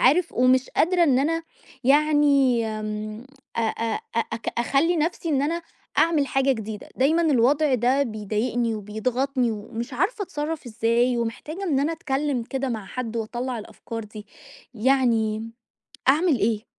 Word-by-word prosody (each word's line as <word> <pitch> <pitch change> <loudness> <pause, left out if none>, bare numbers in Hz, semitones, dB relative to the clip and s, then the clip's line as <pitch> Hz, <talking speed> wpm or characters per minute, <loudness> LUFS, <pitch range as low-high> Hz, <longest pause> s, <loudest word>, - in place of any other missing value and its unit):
عارف 325 +7 +4
ومش 255 +1 +3
قادرة 350 +2 +2
إن 270 -5 +3
أنا 330 +4 0 0.4
يعني 280 -3 +4 0.2
م 215 +1 -5 0.3
أ - - +1
أ 225 0 -1 0.2
أ - - +4
أك 225 0 -4
أخلّي 285 +8 +2
نَفْسي 330 +2 -1
إن 280 -3 +2
أنا 335 +4 -1 0.4
أعمل 315 -4 +3
حاجة 270 0 +2
جديدة. 220 -3 -6
دايمًا 310 +6 +3
الوضع 285 0 +3
ده 255 +3 +2
بيضايقني 225 +1 -1
وبيضغطني 240 +5 -1
ومش 225 +4 -6
عارفة 385 - 0
أتصرَّف 300 -4 -4
إزاي 240 +2 +1
ومحتاجة 255 +10 -4
إن 290 -7 +1
أنا 300 +4 +1
أتكلِّم 285 -4 -1
كده 270 +3 -3
مع 220 -5 -4
حد 235 -3 -5
وأطلَّع 240 +2 -3
الأفكار 225 +1 -7
دي، 210 0 -11 0.5
يعني 225 -3 +1 0.6
أعمل 300 0 +4
إيه؟ 215 +1 0
255 Hz, 145 wpm, -24 LUFS, 225-295 Hz, 0.6 s, عارف